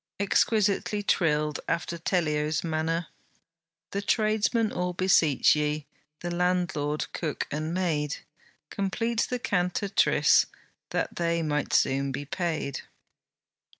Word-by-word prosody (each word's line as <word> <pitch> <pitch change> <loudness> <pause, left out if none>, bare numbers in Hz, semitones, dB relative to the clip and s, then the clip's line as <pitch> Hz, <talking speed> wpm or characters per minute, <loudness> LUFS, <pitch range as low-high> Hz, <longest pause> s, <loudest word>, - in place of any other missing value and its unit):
Exquisitely 205 0 +1
trilled, 150 -5 +1
after 170 0 -1
Tellio's 155 -3 0
manner, 165 +1 -1 0.8
'The 200 - -2
tradesmen 215 +1 +1
all 180 0 -2
beseech 170 -7 +4
ye, 150 0 -1 0.4
The 175 - -3
landlord, 175 -4 0
cook 155 -4 -2
and 155 +2 -2
maid, 160 -5 0 0.6
Complete 225 +4 -1
THE 250 - -1
CANTATRICE, 200 -4 +2 0.4
That - - -2
they 170 -1 0
may 150 -2 0
soon 135 +1 +2
be 140 +2 -5
paid.' 155 -4 -2
170 Hz, 105 wpm, -27 LUFS, 150-195 Hz, 0.8 s, beseech